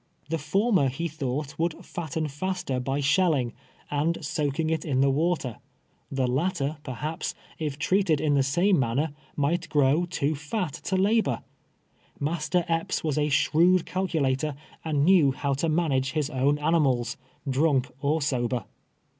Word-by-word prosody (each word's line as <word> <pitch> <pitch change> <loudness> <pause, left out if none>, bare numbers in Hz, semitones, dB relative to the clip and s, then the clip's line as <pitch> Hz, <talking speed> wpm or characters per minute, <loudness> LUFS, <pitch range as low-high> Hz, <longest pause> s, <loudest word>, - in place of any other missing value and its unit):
The 165 0 -1
former, 185 - +2
he 165 +7 -3
thought, 145 -1 -4
would 165 0 -1
fatten 160 -2 -3
faster 175 -2 -2
by 135 +3 -1
shelling, 140 -5 +2 0.4
and 155 +3 0
soaking 150 +1 -1
it 160 -1 0
in 135 -5 0
the 135 0 +4
water 150 -5 0 0.3
— - - -41
the 130 - +3
latter, 145 +3 0
perhaps, 150 +6 -4 0.2
if 150 -3 -3
treated 180 0 +2
in 150 -1 +1
the 140 - +4
same 170 +7 +3
manner, 135 +5 0 0.2
might 150 +5 0
grow 150 +4 +3
too 155 -4 0
fat 155 +4 -3
to 190 - 0
labor. 215 +4 +2 0.8
Master 165 +3 0
Epps 165 -1 -1
was 150 -2 0
a 150 0 +1
shrewd 170 +5 +4
cal 190 +1 -1
culator, 145 -2 0 0.3
and 150 -3 +1
knew 165 -7 +5
how 140 +1 -1
to 150 +5 0
manage 140 -5 +1
his 150 -2 -1
own 135 +3 +2
animals, 145 -6 +1 0.3
drank 135 -1 +2
or 150 +2 +1
sober. 125 -3 -1
150 Hz, 155 wpm, -26 LUFS, 135-170 Hz, 0.8 s, knew